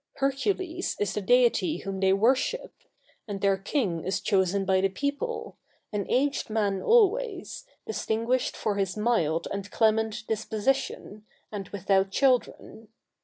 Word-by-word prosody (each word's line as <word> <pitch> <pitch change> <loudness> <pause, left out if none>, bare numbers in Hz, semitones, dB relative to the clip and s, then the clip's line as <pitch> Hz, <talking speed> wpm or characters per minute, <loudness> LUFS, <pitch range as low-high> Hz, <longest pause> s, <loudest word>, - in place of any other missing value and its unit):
Hercules 345 +6 -1
is 205 -2 0
the 210 - -2
deity 250 - +3
whom 195 -1 -5
they 190 0 +3
worship; 260 - +1 0.5
and 200 -2 -4
their 195 0 +3
king 195 - -2
is 190 - -1
chosen 195 -1 +1
by 190 0 +3
the 195 - +2
people, 285 - -3 0.4
an 205 -2 -2
aged 280 +1 +1
man 205 -3 0
always, 450 -1 +2 0.2
distinguished 230 +3 -1
for 205 -2 -1
his 195 0 -1
mild 170 -8 +1
and 200 0 -5
clement 220 +1 +1
disposition, 220 -1 -2 0.2
and 200 -3 -6
without 195 0 +1
children. 245 -2 0
220 Hz, 130 wpm, -27 LUFS, 195-270 Hz, 0.5 s, deity